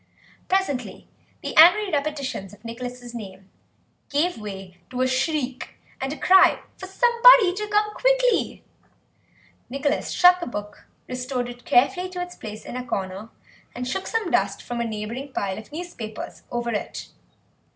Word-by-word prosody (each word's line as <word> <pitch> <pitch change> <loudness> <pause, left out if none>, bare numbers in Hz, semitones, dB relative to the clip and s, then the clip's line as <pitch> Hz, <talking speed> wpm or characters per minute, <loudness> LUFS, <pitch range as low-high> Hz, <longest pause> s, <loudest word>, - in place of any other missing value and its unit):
Presently 370 -10 -1 0.4
the - - -4
angry 375 +5 +7
repetitions 280 -9 -3
of 210 - -17
Nicholas' 245 +1 -7
name 195 -4 -9 0.6
gave 325 +5 +1
way 195 -3 -8
to 255 0 -3
a - - +2
shriek, 260 0 -2 0.3
and 265 +1 -2
a 305 - -5
cry 375 0 +6 0.2
for 375 - -9
somebody 475 -1 +6
to 420 +2 -4
come 420 0 +1
quickly. - - +1 1.1
Nicholas 275 +3 -1
shut 360 0 +6
the 345 - -5
book, 205 -3 -7 0.2
restored 250 0 -3
it 245 0 -10
carefully 360 +9 +3
to 365 -1 -7
its 355 0 -5
place 215 -1 -9
in - - -7
a 255 - -3
corner, 195 -2 -4 0.5
and 250 0 -4
shook 375 +10 -3
some 445 -7 -1
dust 200 0 +1
from 240 -1 -4
a - - -1
neighbouring 230 +5 -5
pile 195 0 -2
of 220 - -13
newspapers 295 -10 -7
over 240 0 -2
it. 210 - -4
255 Hz, 150 wpm, -24 LUFS, 225-360 Hz, 1.1 s, angry